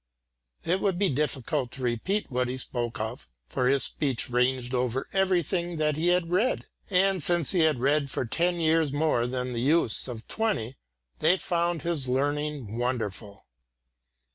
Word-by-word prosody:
It 180 +3 +1
would 195 -3 +1
be 200 0 +2
difficult 140 -1 -1
to 130 - -6
repeat 135 - -1
what 125 0 0
he 125 +1 -3
spoke 120 -2 -3
of, 110 +3 -5 0.2
for 125 - -1
his 135 +1 +3
speech 130 -4 -1
ranged 125 0 +1
over 125 +1 -1
everything 180 -2 +1
that 150 -1 +1
he 160 +3 0
had 175 -1 +2
read, 210 +8 +1 0.2
and 190 -1 +2
since 170 -1 +2
he 185 - +1
had 155 -5 +3
read 140 +2 +2
for 130 - -2
ten 175 +9 0
years 160 -2 +2
more 145 -5 +1
than 125 0 -3
the 115 - -2
youths 140 -3 +3
of 115 -3 -7
twenty, 200 - -1 0.4
they 185 - +4
found 170 -2 -1
his 165 -6 -1
learning 140 -3 -1
wonderful. 110 -5 -3
145 Hz, 165 wpm, -27 LUFS, 125-170 Hz, 0.4 s, they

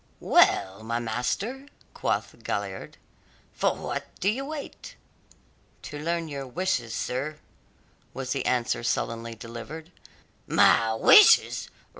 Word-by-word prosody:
"Well, 95 +2 +3
my 115 +1 -2
master," 125 - -3 0.3
quoth - - -3
Galliard, - - -4 0.6
"for - - +1
what - - -5
do 190 - +2
you 255 +6 -2
wait?" 300 -1 -8 0.9
"To 145 - -7
learn 165 +1 -2
your 140 -3 -6
wishes, 130 -6 -2
sir," 140 +5 -3 0.7
was 130 -1 -5
the 135 - -1
answer 125 -2 0
sullenly 115 -1 -2
delivered. 120 +9 -9 0.6
"My 115 -1 +4
wishes! 425 - +6
135 Hz, 110 wpm, -26 LUFS, 115-175 Hz, 0.9 s, wishes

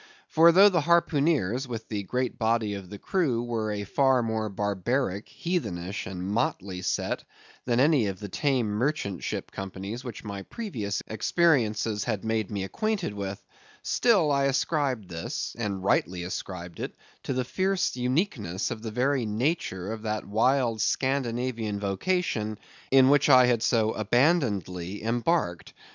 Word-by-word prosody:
For 165 +1 +7
though 195 +4 +8
the 175 -4 +2
harpooneers, 145 - +2
with 115 -2 -6
the 105 -2 -3
great 125 +5 -2
body 110 -2 +1
of 100 -3 -7
the 105 - -7
crew, 130 - 0
were 115 -3 -2
a 105 -1 -3
far 130 +3 +2
more 110 -1 -1
barbaric, 100 +2 -1
heathenish, 100 - -3
and 90 -1 -5
motley 95 -2 -1
set 95 - -1 0.4
than 120 -1 +1
any 140 -5 +4
of 95 -1 -4
the 105 - -6
tame 130 +3 0
merchant 105 - -1
ship - - -4
companies 95 +5 -6
which 120 -3 -7
my 100 -2 -5
previous 110 - -4
experiences 110 - +1
had 110 -4 -2
made 110 -2 0
me 100 -2 -3
acquainted 210 - -2
with, 100 -1 -5 0.4
still 200 -11 +3
I 140 -1 +2
ascribed 135 - 0
this—and 95 +3 -4
rightly 90 -2 +1
ascribed 90 -1 -6
it—to - - -7
the 130 -1 -1
fierce 190 +4 0
uniqueness 125 - -1
of 110 - -5
the 115 - -4
very 125 +2 0
nature 105 - -1
of 110 -1 -5
that 110 -1 -3
wild 115 +1 +2
Scandinavian 120 -5 -1
vocation 110 - -1 0.3
in 135 -1 +6
which 145 0 +4
I 130 -2 +8
had 120 -2 +2
so 110 -2 +2
abandonedly 105 - 0
embarked. 115 - 0
115 Hz, 145 wpm, -27 LUFS, 100-140 Hz, 0.4 s, though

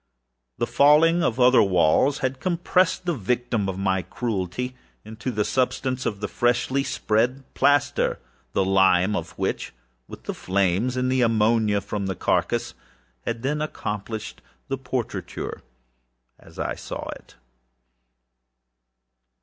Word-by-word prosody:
The - - 0
falling 160 +4 +5
of 125 -6 0
other 125 +1 +6
walls 95 - +3
had 130 0 -2
compressed 180 +2 +1
the 175 - +1
victim 120 - -1
of 95 - -4
my 95 -1 +1
cruelty 120 +3 -3 0.3
into 110 +4 -5
the 105 -4 0
substance 130 0 0
of 105 -2 -4
the 105 - -1
freshly 120 +5 +1
spread 125 +3 0
plaster; 145 -2 +2 0.4
the 95 - +2
lime 95 +1 +4
of - - -5
which, - - -2 0.3
with - - -11
the - - -4
flames, 100 +6 0
and 130 0 +1
the 130 -1 +2
ammonia 110 -2 +3
from 100 -1 -4
the 95 - -2
carcass, - - 0 0.5
had 115 0 -3
then 150 +3 -1
accomplished 110 -7 -5 0.3
the 135 - -1
portraiture 120 -8 -4 0.8
as - - -17
I - - -2
saw - - -7
it. - - -10
120 Hz, 130 wpm, -24 LUFS, 100-130 Hz, 0.8 s, other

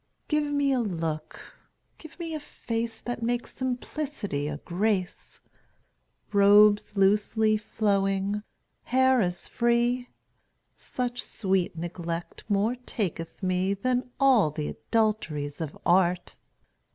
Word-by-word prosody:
Give 300 -1 +1
me 285 -1 +2
a 260 - +2
look, 165 -8 -3 0.6
give 315 - -13
me 335 -2 -5
a 310 - -2
face 230 -5 -4
That 245 -1 -4
makes 240 +1 -2
simplicity 255 - -3
a 150 -1 -3
grace; 185 +3 -2 0.9
Robes 205 +1 +6
losely 210 +2 +3
flowing, 200 -1 0 0.4
hair 260 0 +4
as 180 -2 -2
free; 240 +1 +1 0.7
Such 245 -1 -3
sweet 190 -4 -1
neglect 170 0 -5
more 210 +4 +2
taketh 195 -8 -4
me 185 +1 +1
Than 250 +4 -1
all 260 - +5
th' 150 0 -4
adulteries 165 -11 -1
of 155 -3 -5
art. 180 0 +2
210 Hz, 110 wpm, -27 LUFS, 180-245 Hz, 0.9 s, Robes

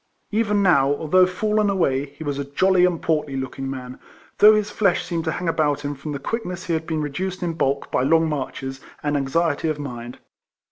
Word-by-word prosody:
Even 210 -2 +1
now, 140 -8 +4
although 180 +5 +3
fiillen 210 +3 +1
away, 145 -8 +1
he 145 +3 -11
was 145 -2 -3
a - - -1
jolly 180 +6 +3
and 175 -2 -1
portly 150 -4 0
looking 135 0 -4
man, 130 -1 -7 0.4
though 215 +1 +8
his 210 -1 -1
flesh 195 -4 +1
seemed 170 -1 -3
to 160 - 0
hang 175 +2 -4
about 150 -3 +1
him 145 - -2
from 145 +2 -7
the 145 - -3
quickness 180 - -4
he 170 - -1
had 160 0 -2
been 155 -2 -1
reduced 180 +6 -4
in 170 -1 -1
bulk 140 -3 -1
by - - +1
long 160 +4 +3
marches, 135 -2 -4 0.2
and 145 -1 0
anxiety 150 +3 0
of 155 - -1
mind. 120 -4 -7
160 Hz, 205 wpm, -22 LUFS, 140-180 Hz, 0.4 s, though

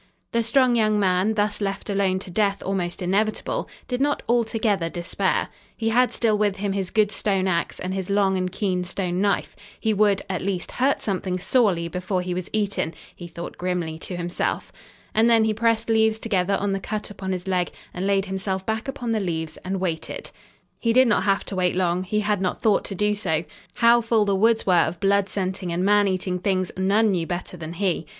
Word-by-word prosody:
The 235 - +2
strong 245 +2 +3
young 215 -2 +3
man, 190 +2 +2
thus 210 0 0
left 195 0 -3
alone 195 -2 +1
to 185 -1 -7
death 200 +1 +1
almost 185 -2 -2
inevitable, 205 +4 0 0.2
did 250 0 -2
not 290 +1 +1
altogether 220 -6 +1
despair. 175 +3 -1 0.3
He 225 -1 0
had 250 +2 +3
still 225 -3 +1
with 205 -2 +2
him 200 0 -2
his 195 -2 -2
good 215 -2 +2
stone 195 -2 0
ax 170 -2 -1
and 185 +1 -3
his 190 -1 -4
long 200 -1 +2
and 185 -1 -1
keen 185 -2 -1
stone 180 0 -2
knife. 200 -1 0 0.2
He 220 -1 +1
would, 205 -1 +3
at 185 -2 -2
least, 185 -2 -2
hurt 270 +2 +1
something 185 -2 -1
sorely 190 -4 +2
before 180 +2 -2
he 180 0 -3
was 180 0 -4
eaten, 200 -6 -1 0.2
he 175 - -9
thought 170 0 -8
grimly 175 -3 -2
to 180 - -6
himself. 175 0 -2 0.4
And 225 +2 +4
then 230 -1 +5
he 220 0 +2
pressed 230 +1 +1
leaves 220 -1 +3
together 200 -4 0
on 205 0 -1
the 195 - -1
cut 210 +2 -4
upon 190 -1 -5
his 185 0 -4
leg, 180 -2 +1 0.2
and 185 +2 -2
laid 195 -1 +2
himself 190 0 -3
back 220 +3 -2
upon 250 -4 -3
the 220 - +1
leaves 160 -5 -3
and 190 +1 -4
waited. 170 -4 -4 0.5
He 230 -1 +1
did 255 +1 +6
not 210 -4 +2
have 195 -1 +1
to 195 - -5
wait 180 -1 +1
long. 180 -1 +1
He 210 +3 -1
had 210 -2 0
not 185 - -1
thought 215 -3 +3
to 195 - -5
do 210 +2 +1
so. 165 -6 -1 0.3
How 235 0 +5
full 225 -2 +2
the 200 - +1
woods 225 +3 +3
were 185 - +3
of 165 +2 -3
blood 200 0 +2
scenting 185 -2 -3
and 175 +2 0
man 205 0 +4
eating 185 -1 -1
things 185 -1 0
none 200 +3 +3
knew 170 -3 -1
better 180 0 -4
than 160 -1 -7
he. 175 -3 -1
195 Hz, 210 wpm, -24 LUFS, 185-215 Hz, 0.5 s, did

